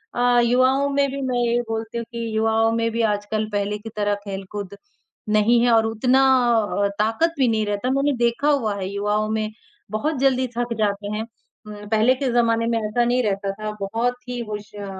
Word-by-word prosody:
अ, 245 0 +3
युवाओं 255 +3 +3
में 280 0 +1
भी 275 +1 -4
मैं 255 -2 -1
ये 240 0 +1
बोलती 225 +1 -4
हूँ 235 - -3
कि 235 -1 -3
युवाओं 225 0 +2
में 230 0 0
भी 230 +1 -1
आजकल 205 +1 -2
पहले 205 0 -1
की 215 +2 -9
तरह 205 -1 0
खेलकूद 195 0 -6 0.6
नहीं 215 +3 +4
है 240 - +3
और 225 -1 +4
उतना 250 +4 +2 0.6
अ, - - +1
ताक़त 225 +11 +1
भी 260 - +4
नहीं 220 -2 +1
रहता 205 +3 -2
है। 260 - +1
मैंने 280 +1 +2
देखा 235 +5 +1
हुआ 225 -8 0
है 190 -1 -3
युवाओं 210 +2 -1
में, 215 0 -1 0.4
बहुत 290 +8 -1
जल्दी 260 -1 +2
थक 240 -1 -1
जाते 205 -1 0
हैं। 220 +1 -3 0.4
उम, 210 - -7 0.2
पहले 220 +4 +4
के 270 0 -2
ज़माने 230 -1 +2
में 230 -1 +1
ऐसा 215 +2 0
नहीं 245 +1 +2
रहता 200 -2 -1
था। 215 +2 -5
बहुत 230 +5 0 0.2
ही 245 -1 -4
होश 210 0 -7
अ, 205 -1 -6
225 Hz, 205 wpm, -22 LUFS, 210-245 Hz, 0.6 s, नहीं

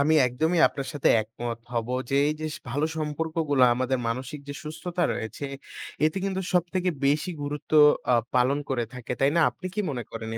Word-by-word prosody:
আমি 155 +3 +4
একদমই 160 +8 +1
আপনার 135 -1 -6
সাথে 145 - +2
একমত 115 +1 -6 0.2
হবো। 115 +2 -1 0.2
যে - - +1
এই - - +1
যে 155 -1 -3
ভালো 145 +5 0
সম্পর্কগুলা 155 -2 +1
আমাদের 130 +1 0
মানসিক 130 +5 -4
যে 145 - -5
সুস্থতা 175 +3 -3
রয়েছে, 110 +6 -5 0.6
এতে 155 +4 +1
কিন্তু 190 -1 -1
সবথেকে 180 +1 +1 0.2
বেশি 150 +6 +1
গুরুত্ব 145 +1 -5 0.4
আ - - +6 0.2
পালন 130 +3 +3
করে 120 -3 0
থাকে, 125 -1 -5
তাই 135 +1 +4
না? - - +5
আপনি 185 - -8
কি 210 - 0
মনে 125 -4 -3
করেন 110 0 -6
145 Hz, 180 wpm, -26 LUFS, 125-160 Hz, 0.6 s, আ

